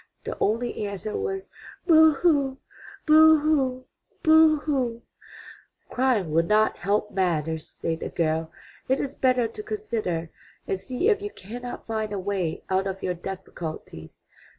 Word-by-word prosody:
The - - -4
only 225 0 -1
answer 200 +1 -5
was, 390 -2 -3 0.4
"Boo 320 -2 +7
hoo! 280 -4 +2 0.5
Boo 315 0 +7
hoo! 265 -4 0 0.4
Boo 315 -1 +6
hoo!" 250 -6 -1 0.9
"Crying 245 -10 +1
will 165 +2 +4
not 215 +5 +2
help 205 +2 0
matters," 160 -4 -1
said 165 -1 -3
the - - -4
girl. 160 0 -1 0.4
"It 265 +1 +1
is 280 -1 -3
better 255 -4 +2
to 425 - -8
consider 220 - -3 0.4
and 190 - -1
see 255 - -2
if 415 -2 +2
you 410 - -4
cannot 245 - -8
find 220 -1 -3
a 205 - -2
way 190 -4 -2
out 190 +1 0
of 195 0 -5
your 180 - 0
difficulties. 170 - -8
225 Hz, 145 wpm, -25 LUFS, 185-290 Hz, 0.9 s, Boo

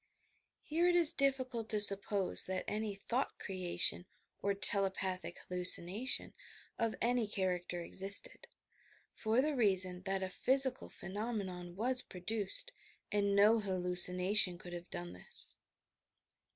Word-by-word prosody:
Here 335 +3 -1
it 355 - +1
is 340 -2 +4
difficult 260 -6 -1
to 215 - +1
suppose 200 -1 +6
that 190 0 -4
any 210 -1 -4
thought 240 +7 -4
creation 180 -2 0 0.3
or 200 0 -2
"telepathic 190 -2 +1
hallucination" 180 +6 +1 0.5
of 230 -1 -2
any 240 -1 0
character 180 -3 -3
existed, 195 +3 0 0.7
for 225 +4 -1
the 300 0 -2
reason 185 -6 0
that 195 0 -2
a 190 - -4
physical 265 +4 0
phenomenon 190 -4 -7
was 250 +5 +2
produced 205 - -4 0.4
and 200 -1 -1
no 210 +3 +4
hallucination 180 0 +1
could 175 0 -12
have 175 0 -10
done 85 0 -6
this. 90 - +1
200 Hz, 120 wpm, -33 LUFS, 180-230 Hz, 0.7 s, suppose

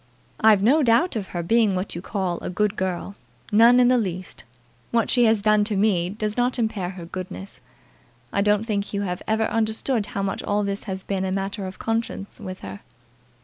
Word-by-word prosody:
"I've 215 -3 +5
no 280 +8 +5
doubt 265 +6 +3
of 205 -4 -3
her 175 -1 -4
being 220 +1 +3
what 185 +2 -3
you 170 - -5
call 185 -3 -2
a - - -5
good 210 +3 0
girl, 190 +1 -3 0.4
none 230 +4 +6
in 245 - +5
the 250 0 +4
least. 185 -4 -5 0.5
What 230 -1 +1
she 245 -2 +4
has 220 -2 +3
done 215 -1 +4
to 210 -1 -1
me 190 -4 +2
does 215 +1 -3
not 245 +1 +1
impair 220 -6 -1
her 180 -2 -8
goodness. 185 +3 -7 0.7
I 200 - +2
don't 210 +1 +2
think 205 -2 -2
you 200 - -1
have 180 -2 -3
ever 220 0 +1
understood 220 +1 0
how 195 - -3
much 195 - -2
all 205 0 0
this 200 0 -3
has 190 -1 -5
been 195 -1 -2
a 190 - -1
matter 195 +1 -3
of 185 - -9
conscience 225 -3 -3
with 185 0 -7
her." 95 +1 -8
205 Hz, 205 wpm, -23 LUFS, 190-225 Hz, 0.7 s, none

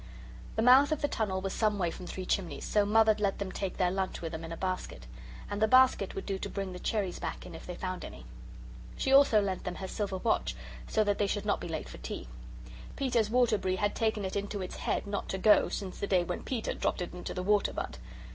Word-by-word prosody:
The 220 - +1
mouth 265 +4 +7
of 305 -1 -1
the - - +4
tunnel 200 -8 -1
was 195 0 -3
some 215 -2 +1
way 175 -4 0
from 180 - -8
Three 185 - -5
Chimneys, 180 -1 -1
so 205 -1 +2
Mother 220 0 +5
let 200 -2 +1
them 200 -2 -4
take 190 0 -4
their 180 -1 +2
lunch 190 0 -2
with 165 -1 -5
them 160 0 -5
in 165 - -7
a 165 - -5
basket. 185 - -3 0.4
And 205 0 -4
the 220 - +5
basket 255 -5 +4
would 195 - -4
do 195 -1 -2
to - - -4
bring 195 -2 -4
the 180 - -7
cherries 200 -4 -1
back - - -5
in 175 - -9
if 160 - -10
they 180 - -5
found 185 0 -4
any. 65 -1 -9 0.7
She 265 - +1
also 275 -6 +7
lent 195 -2 -2
them 180 -1 -4
her 190 - -5
silver 200 -1 -3
watch - - 0 0.3
so 215 - +2
that 205 -1 0
they 205 - +2
should 205 +1 -2
not 205 - +1
be - - -4
late 160 -2 -4
for - - -10
tea. - - -6 0.7
Peter's 240 -6 +1
Waterbury 220 -6 +2
had 205 +2 0
taken 220 -3 0
it 190 - -4
into 200 0 -2
its 185 - -6
head - - -1
not 200 0 -3
to 190 - -1
go 210 +2 +5
since 190 -2 -5
the 200 - -2
day 185 -3 +3
when 175 +1 -4
Peter 240 -4 -2
dropped - - -1
it 175 - -7
into 180 - -6
the 180 - -2
water 205 +1 +3
butt. - - -5
195 Hz, 250 wpm, -31 LUFS, 185-215 Hz, 0.7 s, mouth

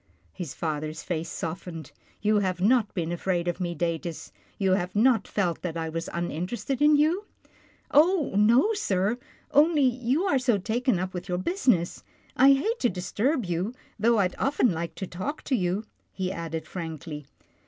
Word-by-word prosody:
His 175 -7 -6
father's 155 0 -3
face 165 -2 -3
softened. 165 -2 -6 0.2
" - - -33
You 210 0 +4
have 185 -3 -1
not 215 +2 +3
been 170 -2 -1
afraid 175 0 -1
of 175 +1 -1
me, 175 -2 -2
Datus. 165 0 -3 0.3
You 190 -2 +1
have 185 0 0
not 230 +2 +4
felt 180 -5 -1
that 170 -2 -4
I 160 -1 -2
was 165 +1 -4
uninterested 180 - -3
in 300 0 +6
you? 320 +8 +2 0.2
" - - -30
" - - -33
Oh! 320 - +4
no, 235 - +5
sir, 210 - 0 0.3
only 300 +1 +5
you 255 +5 +1
are 330 -9 +2
so 250 -4 +2
taken 230 +3 0
up 185 +1 -3
with 180 0 -6
your 180 - 0
business. 185 - +1 0.3
I 275 +2 +7
hate 435 - 0
to 245 - +2
disturb 225 - -1
you, 180 +7 -2 0.2
though 230 +2 +4
I'd 185 -3 +2
often 270 -4 +2
like 170 0 -4
to 190 - -4
talk 190 - -5
to 265 - 0
you," 190 +1 -1 0.3
he 185 -1 -3
added 165 -2 -4
frankly. 160 -4 -6
190 Hz, 180 wpm, -27 LUFS, 170-255 Hz, 0.3 s, I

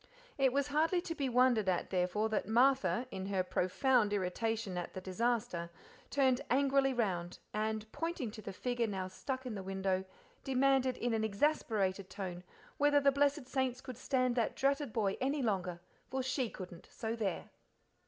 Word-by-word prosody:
It 270 -2 +3
was 280 +2 0
hardly 320 +5 +2
to 335 - -4
be 280 -5 -1
wondered 245 -5 +4
at, 180 - -1
therefore, 185 +4 +1
that 215 -3 -1
Martha, 255 +2 +3
in 190 0 -4
her 195 -2 +1
profound 210 +5 +2
irritation 205 +1 -1
at 175 -1 -4
the - - -3
disaster, 185 -3 -1 0.4
turned 265 -3 +3
angrily 275 +1 +3
round, 185 -8 -1 0.2
and, 215 0 -1
pointing 330 -9 -3
to 215 - -9
the 200 - -6
figure 240 +3 -1
now 190 -3 -3
stuck 260 +7 -4
in 250 - -3
the 200 - -4
window, 190 0 -1 0.4
demanded 265 -1 +2
in 240 -1 -1
an 220 -1 +1
exasperated 200 -5 0
tone 180 -3 -5 0.4
whether 290 0 +5
the 280 0 +4
blessed 280 0 +2
saints 260 -1 -1
could 260 -1 -8
stand 255 0 +1
that 235 -3 0
dratted 275 -1 +1
boy 205 -3 0
any 275 +2 0
longer, 185 -5 -1 0.3
for 265 0 -1
she 260 -2 0
couldn't, 180 -4 -9
so 225 0 -3
there. 205 -6 -3
235 Hz, 170 wpm, -34 LUFS, 195-265 Hz, 0.4 s, whether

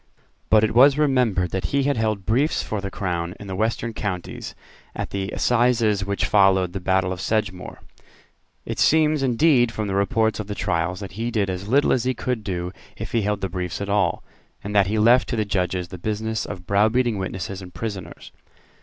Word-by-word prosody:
But 110 0 +5
it 110 - +1
was 135 +4 +6
remembered 125 - +2
that 95 -2 -2
he 140 +9 0
had 140 +1 +1
held 110 -4 -1
briefs 135 +8 +1
for 105 -2 -3
the 100 - -4
Crown, 90 -2 -3
in 105 - -9
the 95 -1 -5
Western 115 +2 -1
counties, 95 -5 -5 0.4
at - - -4
the 95 0 -3
assizes 115 -5 +2
which 100 +1 -1
followed 95 -3 +3
the 95 - -3
battle 95 0 +1
of 90 - -7
Sedgemoor. 100 -4 -2 0.9
It - - -5
seems 155 -1 +3
indeed 125 -1 +3
from 110 -1 -3
the 95 - -2
reports 110 +2 +1
of 105 - -4
the 105 - -4
trials 85 +2 -1
that 100 - -7
he 120 - -1
did 105 -5 0
as 95 +2 -5
little 140 +6 +3
as 125 - +1
he 130 0 0
could 125 -2 -3
do 90 -3 -3 0.3
if - - -6
he 115 - +1
held 105 0 -1
the 95 - -1
briefs 90 -3 -4
at 100 0 -4
all, 100 0 +1 0.4
and 105 +1 -5
that 100 -2 +4
he 110 +3 -1
left 120 +4 +4
to - - -1
the 110 -2 0
Judges 90 -2 -1
the 90 -1 -8
business 110 +3 -2
of 90 -3 -7
browbeating 110 +3 +2
witnesses 95 0 -5
and 90 -1 -10
prisoners. 100 -7 -6
105 Hz, 205 wpm, -23 LUFS, 95-115 Hz, 0.9 s, was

